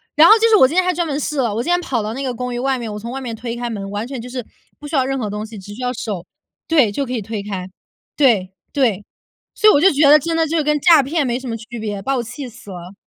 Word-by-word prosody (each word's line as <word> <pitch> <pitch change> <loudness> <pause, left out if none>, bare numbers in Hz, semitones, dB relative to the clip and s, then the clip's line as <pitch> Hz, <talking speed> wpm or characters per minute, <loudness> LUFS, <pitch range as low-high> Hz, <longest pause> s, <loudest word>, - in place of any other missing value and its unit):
然 315 +3 +8
后 - - +9
就 455 +1 +4
是 435 - +6
我 260 - +7
今 300 - -5
天 370 - +4
还 365 0 +1
专 340 0 -1
门 285 -2 -2
试 300 0 -3
了， 235 -5 +1
我 230 - -1
今 - - -4
天 355 0 +3
跑 255 -10 -2
到 215 +1 -4
那 265 - -5
个 260 -2 -2
公 250 +1 -4
寓 240 - -3
外 265 +1 0
面， 230 -3 -5
我 210 - -6
从 230 +3 -7
外 270 +1 -5
面 240 -3 -5
推 230 +1 -5
开 240 0 -4
门， 200 -3 -5
完 205 +2 -3
全 260 0 -6
就 240 - -9
是 250 -2 -5 0.3
不 295 - -12
需 310 - -3
要 260 - +2
任 270 +1 -2
何 220 -5 -3
东 210 +1 -4
西， 220 0 -10
只 205 +1 -10
需 245 - -9
要 250 0 -1
手 205 -6 -5 0.4
对， 285 -10 +3
就 275 +7 -2
可 255 - -5
以 235 - -2
推 215 +1 -5
开。 195 -3 -5 0.5
对， 220 -10 +3 0.2
对， 225 -8 +1 0.5
所 430 - +5
以 - - +6
我 - - +4
就 370 +6 +6
觉 285 0 +4
得 300 +1 +8
真 330 +3 -2
的 325 0 +2
就 330 +2 -1
是 310 - +1
跟 300 0 +1
诈 330 -4 +7
骗 290 +2 -1
没 245 0 -1
什 260 - -8
么 230 - -3
区 230 +1 -8
别， 205 -2 -4
把 270 +5 -1
我 - - 0
气 255 +3 -7
死 225 -3 -13
了。 180 +1 -9
250 Hz, 350 characters per minute, -19 LUFS, 220-290 Hz, 0.5 s, 后